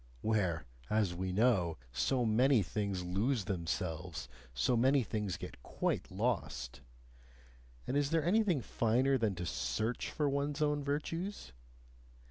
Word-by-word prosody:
where, 95 Hz, -, +1 dB, 0.2 s
as 105 Hz, -4 st, +2 dB
we 90 Hz, +1 st, -3 dB
know, 95 Hz, -6 st, +2 dB
so 115 Hz, -, +1 dB
many 120 Hz, +1 st, +4 dB
things 100 Hz, 0 st, -2 dB
lose 105 Hz, +5 st, 0 dB
themselves, 90 Hz, -2 st, -3 dB, 0.2 s
so 60 Hz, -, +1 dB
many 130 Hz, +3 st, +4 dB
things 105 Hz, -4 st, -2 dB
get -, -, -8 dB
quite -, -, -2 dB
lost! -, -, -2 dB, 1.0 s
And -, -, -2 dB
is 145 Hz, -1 st, +2 dB
there 165 Hz, -1 st, +1 dB
anything 185 Hz, -, +3 dB
finer 125 Hz, +5 st, +2 dB
than 110 Hz, -4 st, +1 dB
to 90 Hz, 0 st, -4 dB
SEARCH 110 Hz, +7 st, -1 dB
for 150 Hz, -, 0 dB
one's 140 Hz, +1 st, -1 dB
own 150 Hz, -1 st, +1 dB
virtues? 155 Hz, -, -3 dB
110 Hz, 130 wpm, -34 LUFS, 90-140 Hz, 1.0 s, many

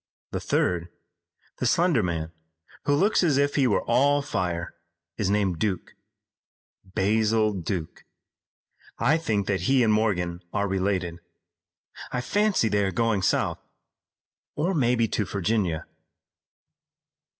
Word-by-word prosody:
The -, -, -2 dB
third, 90 Hz, -1 st, 0 dB, 0.7 s
the -, -, +1 dB
slender 170 Hz, -8 st, +3 dB
man 85 Hz, -3 st, -2 dB, 0.5 s
who 145 Hz, 0 st, +3 dB
looks 200 Hz, +9 st, +3 dB
as 155 Hz, -7 st, +2 dB
if 140 Hz, 0 st, +2 dB
he 135 Hz, -3 st, +3 dB
were 105 Hz, -, +1 dB
all 140 Hz, +4 st, +3 dB
fire, 90 Hz, -10 st, -3 dB, 0.4 s
is 100 Hz, -3 st, -1 dB
named 100 Hz, -5 st, +1 dB
Duke, 100 Hz, -5 st, -2 dB, 0.9 s
Basil 110 Hz, +3 st, +1 dB
Duke. 90 Hz, -3 st, -4 dB, 0.9 s
I 135 Hz, +8 st, +3 dB
think 105 Hz, -10 st, -1 dB
that 95 Hz, 0 st, -1 dB
he 135 Hz, -2 st, +4 dB
and 110 Hz, -2 st, +3 dB
Morgan 90 Hz, -5 st, 0 dB
are 100 Hz, -, 0 dB
related. 95 Hz, -3 st, -1 dB, 0.9 s
I 125 Hz, -, -1 dB
fancy 205 Hz, -, +1 dB
they 105 Hz, -1 st, +1 dB
are 95 Hz, -, +1 dB
going 115 Hz, -3 st, +1 dB
south, -, -, +1 dB, 1.0 s
or 170 Hz, +6 st, 0 dB
maybe 120 Hz, -6 st, +2 dB
to 105 Hz, -, 0 dB
Virginia." 100 Hz, -4 st, -1 dB
105 Hz, 125 wpm, -26 LUFS, 95-130 Hz, 1.0 s, he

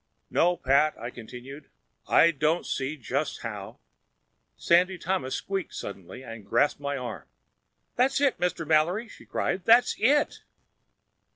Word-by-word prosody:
"No, 175 Hz, +1 st, +3 dB
Pat," 140 Hz, 0 st, +2 dB
I 120 Hz, -, -5 dB
continued, 125 Hz, +5 st, -10 dB, 0.4 s
"I 170 Hz, -, +5 dB
don't 155 Hz, +3 st, 0 dB
see 135 Hz, +3 st, -3 dB
just 140 Hz, +3 st, -3 dB
how—" 105 Hz, -4 st, -6 dB, 0.8 s
Sandy 180 Hz, +2 st, +3 dB
Thomas 175 Hz, -7 st, -2 dB
squeaked 195 Hz, -2 st, -4 dB
suddenly 100 Hz, +5 st, -8 dB
and 115 Hz, -3 st, -9 dB
grasped 120 Hz, +9 st, +1 dB
my 140 Hz, 0 st, -3 dB
arm. 125 Hz, -2 st, -6 dB, 0.7 s
"That's 260 Hz, +2 st, +3 dB
it, 280 Hz, -2 st, +2 dB
Mr. 180 Hz, -2 st, -1 dB
Mallory!" 165 Hz, +9 st, +2 dB
she -, -, -15 dB
cried. 190 Hz, -, -2 dB
"That's 230 Hz, +5 st, +5 dB
it!" 285 Hz, +7 st, +2 dB
155 Hz, 130 wpm, -27 LUFS, 130-180 Hz, 0.8 s, I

